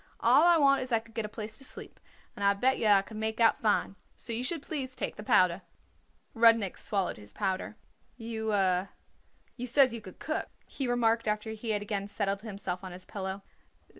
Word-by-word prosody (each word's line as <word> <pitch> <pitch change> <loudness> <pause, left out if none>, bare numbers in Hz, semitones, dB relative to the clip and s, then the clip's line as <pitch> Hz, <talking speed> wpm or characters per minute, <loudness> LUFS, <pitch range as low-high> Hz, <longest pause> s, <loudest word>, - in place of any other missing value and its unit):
All - - +5
I 345 -1 +6
want 275 -3 +4
is 255 0 -5
I 230 - +4
could 225 0 -10
get 225 -1 -2
a - - -6
place 215 +1 -7
to - - -6
sleep, - - -6 0.4
and 200 - -5
I 200 0 +4
bet 260 +6 +2
yer 215 -2 +3
I 195 -1 +4
could 215 +1 -10
make 220 +1 -2
out 230 -1 +4
fine. 210 -2 +1 0.2
So 235 - -3
you 235 +2 -2
should 315 +2 -3
please 260 -4 -4
take - - -3
the - - -8
powder." 185 -3 +3 0.7
Rudnik 225 -4 +4
swallowed 195 -3 -1
his 105 -1 -13
powder. 195 +2 -2 0.4
"You 225 -2 -4 1.1
says 255 0 +4
you 230 - -5
could 185 -3 -12
cook," 315 - -3 0.2
he 270 - -4
remarked 230 -2 +2
after 210 +1 -1
he 220 +1 -6
had 205 -1 0
again 200 -1 -3
settled 200 -1 -2
himself 195 -4 -5
on 185 -1 -7
his 180 +1 -10
pillow. 195 0 -5
220 Hz, 200 wpm, -30 LUFS, 200-235 Hz, 1.1 s, I